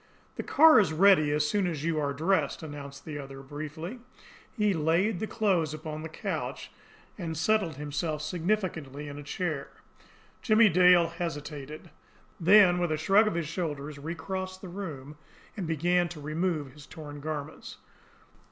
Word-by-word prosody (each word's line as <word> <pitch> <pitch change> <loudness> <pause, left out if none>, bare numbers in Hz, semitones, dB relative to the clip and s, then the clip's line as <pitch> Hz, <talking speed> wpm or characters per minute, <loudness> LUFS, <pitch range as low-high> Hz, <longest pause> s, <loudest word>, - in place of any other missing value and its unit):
"The - - -3
car 315 -4 +7
is 195 -6 +2
ready 180 -3 +5
as 150 0 +1
soon 195 +3 +1
as 155 -4 -3
you 165 -1 0
are 145 -1 0
dressed," 160 +1 0
announced 145 -2 -8
the 150 -2 -5
other 135 -1 -9
briefly. 155 - -7 0.5
He 210 -4 +1
laid 170 +5 +1
the 220 - -2
clothes 185 -10 0
upon 155 0 -6
the 160 - -6
couch 160 - -5 0.5
and 165 -3 -4
settled 190 -3 +1
himself 150 +2 -3
significantly 160 -5 -2
in 145 0 -7
a - - -8
chair. 150 -2 -3 0.7
Jimmie 220 -2 +5
Dale 180 -1 +5
hesitated. 155 -2 -6 0.5
Then, 180 0 +6
with 175 -2 0
a 155 - +1
shrug 195 +7 +4
of 190 - -1
his 170 -3 -2
shoulders, 150 -3 -4
recrossed 185 +4 -5
the 185 - -8
room, 155 -7 -7 0.4
and 190 -6 -4
began 175 +2 +1
to 160 -2 -9
remove 155 -1 -2
his 145 +1 -14
torn 145 -2 -9
garments. 150 0 -6
160 Hz, 155 wpm, -28 LUFS, 150-185 Hz, 0.7 s, car